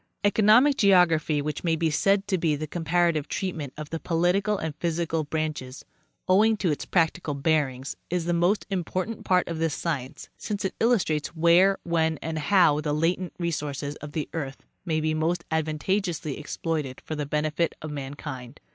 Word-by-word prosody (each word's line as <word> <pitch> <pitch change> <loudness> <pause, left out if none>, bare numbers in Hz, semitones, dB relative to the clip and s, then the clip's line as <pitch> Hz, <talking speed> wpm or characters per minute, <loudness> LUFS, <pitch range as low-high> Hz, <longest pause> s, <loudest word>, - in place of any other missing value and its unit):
Kconomic 220 +7 +5
geography—which 160 -6 +3
may 165 -2 +2
be 160 0 0
said 195 +5 +2
to 190 -3 0
be 160 -3 +1
the 155 +2 -4
compara 170 +2 +1
tive 155 -2 -3
treatment 165 -8 -3
of 150 -1 -7
the 165 - -3
political 180 +6 +1
and 160 -4 -3
physical 165 -1 -1
branches—owing 155 +8 -1
to 185 -5 +1
'its 145 - -3
practical 165 -3 +1
bearings, 140 -3 0
is 175 -1 -1
the 175 - 0
most 175 +5 +2
important 185 +4 -3
part 180 -1 +2
of 165 -1 -4
this 160 -2 0
science, 145 -3 -4
since 205 -3 -3
it 190 - -1
illustrates 175 -10 +1
where, 170 +4 +5
when 160 -2 +1
and 160 0 -3
how 155 -1 +4
the 150 -1 -1
latent 170 +4 0
resources 150 -4 -3
of 150 -1 -9
the 155 - -2
earth 135 -4 -5 0.2
may 160 -3 0
be 155 0 0
most 165 +3 0
advantageously 160 0 -1
exploited 150 -3 -3
for - - -4
the 150 -2 -3
benefit 150 +3 0
of 155 - -5
mankind. 135 -2 -7
160 Hz, 165 wpm, -26 LUFS, 150-180 Hz, 0.2 s, Kconomic